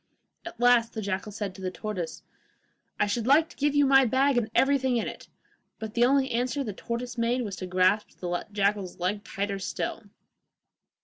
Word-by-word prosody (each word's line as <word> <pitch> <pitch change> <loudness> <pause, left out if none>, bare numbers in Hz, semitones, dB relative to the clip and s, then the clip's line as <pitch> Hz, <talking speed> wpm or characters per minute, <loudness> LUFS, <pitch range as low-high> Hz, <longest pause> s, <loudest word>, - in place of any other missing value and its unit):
At 290 - -10
last 240 -1 +4
the 220 - -4
jackal 200 +2 -3
said 205 -2 -4
to 190 - -12
the 185 - -2
tortoise, 185 -3 -5 0.8
'I - - +4
should 220 +3 -2
like 310 +4 +5
to - - -15
give 290 0 0
you 290 0 +5
my 270 0 +6
bag 265 +3 +2
and 235 -3 +1
everything 265 -2 +3
in 225 - -1
it,' - - -8 0.5
but 220 -1 -6
the 240 0 +4
only 270 0 +2
answer 250 +3 0
the 215 -5 -5
tortoise 235 +3 -5
made 240 +2 +1
was 200 -4 -5
to 185 - -5
grasp 185 +3 +1
the 175 -1 -3
jackal's 200 -2 0
leg 200 +4 -2
tighter 200 0 -3
still. 190 - -3
230 Hz, 190 wpm, -27 LUFS, 200-255 Hz, 0.8 s, my